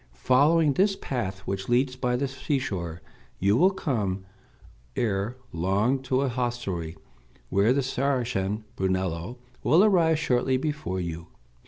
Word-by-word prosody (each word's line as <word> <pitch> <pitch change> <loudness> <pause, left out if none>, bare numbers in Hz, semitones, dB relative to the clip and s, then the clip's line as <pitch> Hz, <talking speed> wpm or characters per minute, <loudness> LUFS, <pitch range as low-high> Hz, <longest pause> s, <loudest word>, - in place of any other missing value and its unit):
Following 145 +4 +4
this 195 +5 +3
path 100 - -4
which 95 +1 -4
leads 130 +2 +2
by 125 -1 0
the 140 +3 0
seashore, 105 - -3 0.3
you 100 +2 +3
will 180 +9 +5
come 110 - -2 0.7
ere 110 +2 -1 0.2
long 100 +10 +1
to 130 0 0
a 140 - +1
hostelry, 120 -10 -3 0.5
where 100 +5 +3
the 140 +1 +2
Saracen 125 -6 -1
Brunello 95 +3 -1 0.2
will 170 +6 +5
arrive 170 -6 +4
shortly 130 -3 +1
before 150 -9 -3
you. 85 -1 -5
125 Hz, 130 wpm, -26 LUFS, 95-135 Hz, 0.7 s, will